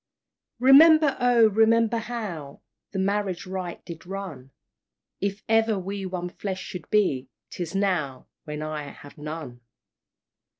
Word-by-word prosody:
"Remember, 290 +3 +7
oh! 245 -2 +5
remember, 225 +2 +3
how 210 -11 -6 0.3
The 195 - -5
marriage 195 -2 -1
rite 185 -2 -6
did 165 -1 -9
run, 185 -9 -7 0.7
If 200 +1 -3
ever 225 -1 +3
we 195 +1 -4
one 180 -1 -4
flesh 190 +1 -5
should 175 -4 -8
be 140 -12 +1 0.2
'Tis 175 0 -5
now 175 -10 -1 0.2
when 150 -1 -5
I 155 -1 -4
have 145 +1 -12
none! 150 -5 -7
190 Hz, 125 wpm, -25 LUFS, 160-220 Hz, 0.7 s, Remember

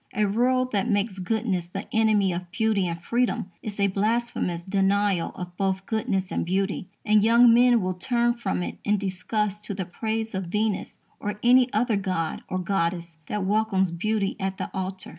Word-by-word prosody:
A 210 +1 +2
world 255 +5 +1
that 200 +2 0
makes 205 -2 0
goodness 190 -2 -1
the 195 +3 -6
enemy 215 -4 +3
of 175 0 -5
beauty 210 -1 +1
and 170 0 -4
freedom 235 -5 0
is 205 -1 -6
a 200 - +4
blasphemous 205 -3 -1
denial 195 -1 +1
of 180 -1 -7
both 190 -1 -1
goodness 195 -4 -1
and - - -1
beauty, 190 +2 -1 0.2
and 210 -1 +4
young 235 +1 +6
men 245 0 +5
will 185 0 -1
turn 235 +6 +1
from 205 -6 -2
it - - -6
in 210 0 +2
disgust 205 +2 -2
to 200 - -4
the 190 -1 -3
praise 220 +4 -3
of 190 -1 -2
Venus 210 +3 -2 0.2
or 205 0 -4
any 250 +1 +5
other 220 0 +1
god 185 -5 -2
or 185 - -1
goddess 170 -2 -2
that 210 -2 -2
welcomes 195 -3 +1
beauty 200 +3 -1
at 190 -1 -2
the - - -5
altar. 190 0 -4
200 Hz, 180 wpm, -25 LUFS, 185-220 Hz, 0.2 s, young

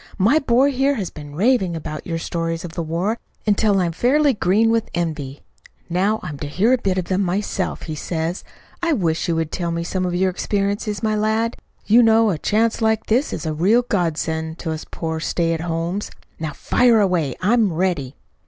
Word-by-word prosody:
"My 225 +10 +4
boy 270 0 +3
here 275 +2 +1
has 195 -7 -4
been 145 -1 -10
raving 195 -2 +2
about 155 -1 -6
your 165 -1 -2
stories 165 +1 -3
of 170 - -7
the 175 - -3
war 175 +8 -1 0.3
until 205 -1 +3
I'm 175 -2 +1
fairly 275 - +3
green 210 +2 +2
with 230 -1 0
envy. 155 -5 -3 0.5
Now 200 +5 +1
I'm 145 -2 -6
to 145 - -4
hear 200 - +2
a 255 - +2
bit 190 -4 0
of 185 - -1
them 185 +2 0
myself, 190 0 -2
he 155 - -5
says. 165 +3 -3 0.4
I 335 -2 +2
wish 165 - 0
you 170 - +1
would 160 -1 -1
tell 175 -2 -2
me 170 0 -2
some 185 +2 -2
of 175 - -2
your 185 +1 +2
experiences, 205 +2 -2
my 215 -1 +1
lad. 220 +2 0 0.3
You 230 +3 +6
know 225 -1 +5
a 160 - -3
chance 225 +6 +1
like 220 0 +1
this 250 +7 +1
is - - -4
a 155 - -1
real 200 +10 +3
god 175 -9 0
send 160 0 -3
to 165 - -4
us 160 0 -5
poor 160 -1 -3
stay 165 +1 0
at 165 - -3
homes. 170 +4 -2 0.3
Now 155 -2 -3
fire 240 - +3
away! 175 -9 +1
I'm 215 +1 +3
ready." 160 -6 -1
185 Hz, 205 wpm, -21 LUFS, 165-220 Hz, 0.5 s, You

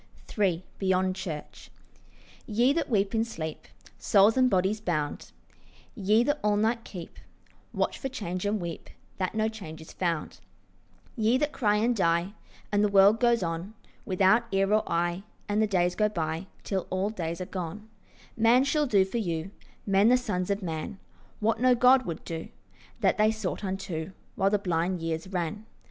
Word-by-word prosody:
III 185 -4 +1
BEYOND 185 -1 +1
CHURCH 160 -6 -7 0.8
YE 240 +5 +3
that 330 - -1
weep 200 -3 +1
in 225 0 +2
sleep, 160 -9 -6 0.3
Souls 205 +1 +4
and 255 -1 +4
bodies 195 +2 +1
bound, 155 -7 -2 0.6
Ye 215 0 +3
that 290 +3 0
all 210 0 +3
night 225 +2 +1
keep 175 -4 -9 0.5
Watch - - -1
for 270 - -3
change, 185 -7 -4
and 205 +1 0
weep 170 -2 -6 0.3
That 185 +2 -2
no 220 0 +2
change 195 -8 -8
is 160 - -12
found; 170 -4 -2 0.8
Ye 225 +2 +2
that 295 +2 0
cry 210 -7 +1
and 230 +3 +2
die, 170 0 +1 0.4
And 205 0 +3
the - - +4
world 200 +2 +5
goes 235 -3 +3
on 170 +5 -4 0.3
Without 195 +5 +3
ear 195 +1 +2
or 215 - +4
eye, 175 +2 0 0.3
And 210 +1 +1
the 220 - +3
days 180 -3 +1
go 210 +2 +2
by 165 -1 -3 0.2
Till 190 -2 -2
all 190 +3 -1
days 170 -4 -4
are 185 - -3
gone; 185 +4 -6 0.5
Man 230 +3 +5
shall 295 +1 +1
do 200 -5 +4
for 215 +5 -3
you, 170 -2 -3 0.3
Men 200 +2 +4
the 250 - +6
sons 195 -7 -2
of 200 0 -1
man, 165 +3 -4 0.4
What 220 +1 +1
no 255 0 +5
God 255 +1 +5
would 170 - -5
do 165 -1 -5 0.5
That - - +2
they 215 0 +5
sought 220 -1 -3
unto 185 -3 -4 0.2
While 195 -1 +2
the 210 - +2
blind 180 -1 -1
years 165 +1 -3
ran. 190 +4 -3
195 Hz, 175 wpm, -28 LUFS, 175-220 Hz, 0.8 s, the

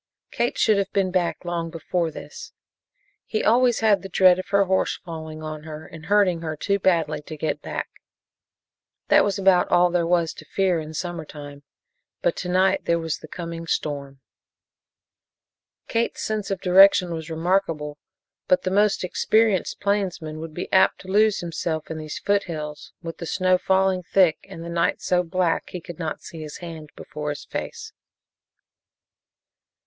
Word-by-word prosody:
Kate 240 - -1
should 215 -2 +4
have 195 0 -2
been 190 -2 +1
back 180 -1 -1
long 170 -1 -2
before 165 +1 -2
this. 465 - -10 0.7
He 215 - -1
always 240 +1 +3
had 205 -4 +3
a 195 - -7
dread 185 -1 +5
of 185 - -5
her 200 0 +3
horse 190 0 +1
falling 160 -2 -7
on 155 -1 -5
her 155 0 -8
and 160 0 -11
hurting 195 -4 +3
her 155 -1 -3
too 200 +5 0
badly 165 -6 +1
to 155 +1 -9
get 150 0 -2
back. - - -4 1.2
That - - +6
was 200 -1 0
about 190 -2 +4
all 175 0 +4
there 170 -1 +1
was 170 -2 +2
to 155 - -12
fear 185 0 +1
in 155 0 -7
summer 175 0 -4
time, 145 -2 -10 0.6
but - - +2
to 180 - -4
night 185 +1 +2
there 170 - +2
was 165 -2 -3
the - - -11
coming 165 0 -6
storm. 140 -3 -3 1.7
Kate's 230 +1 -1
sense 215 -2 -2
of 195 -2 -2
direction 185 -1 +6
was 160 0 -6
remarkable, 160 -3 -1 0.5
but 185 - +3
the 185 - -1
most 205 +1 +2
experienced 215 +1 +1
plainsman 180 -6 -1
would 160 -1 -8
be 175 - -4
apt 190 - +4
to 190 - -11
lose 215 +1 +3
himself 165 -2 -3
in 160 - -4
these 155 -1 -6
foothills, 160 -7 -2
with 165 0 -7
the 170 - -5
snow 185 +1 +2
falling 190 0 +2
thick 180 -2 +2
and 165 - -8
the - - -7
night 170 0 0
so 180 -1 +1
black 180 -1 0
he 180 - -6
could 175 -1 -10
not 160 -3 -4
see 165 - -9
his 150 -1 -7
hand 160 -3 -8
before 150 0 -6
his 145 - -5
face. - - -6
175 Hz, 170 wpm, -24 LUFS, 160-190 Hz, 1.7 s, That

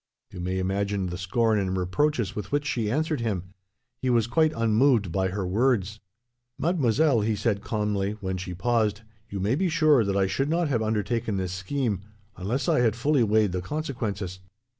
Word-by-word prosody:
You - - -9
may 90 +1 -2
imagine 100 +1 -1
the 90 - -5
scorn 110 +3 +1
and 95 -1 -1
reproaches 105 +6 0
with 105 -2 -5
which 145 0 0
she 120 -6 -1
answered 155 +4 0
him. 95 -5 -3 0.5
He 130 - 0
was 120 -3 +3
quite 155 +6 +2
unmoved 115 -3 +3
by 95 +2 +1
her 95 +1 -3
words. 105 0 +1 0.6
"'Mademoiselle,' 145 -5 +2
he 110 +1 0
said 100 -1 0
calmly, 105 -3 -1
when 95 -3 -4
she 90 0 -6
paused, 110 0 +1 0.3
'you 100 - -4
may 100 +5 +1
be 180 +6 +1
sure 155 -6 +4
that 100 -1 0
I 95 - +3
should 135 +9 -1
not 165 -1 +1
have 120 -5 +1
undertaken 110 0 -1
this 90 -1 -2
scheme, 105 +2 -2 0.3
unless 110 +9 -2
I - - +3
had 115 -3 +2
fully 140 +3 +2
weighed 110 -2 +3
the 90 0 -2
consequences. 105 - -4
110 Hz, 185 wpm, -26 LUFS, 95-130 Hz, 0.6 s, sure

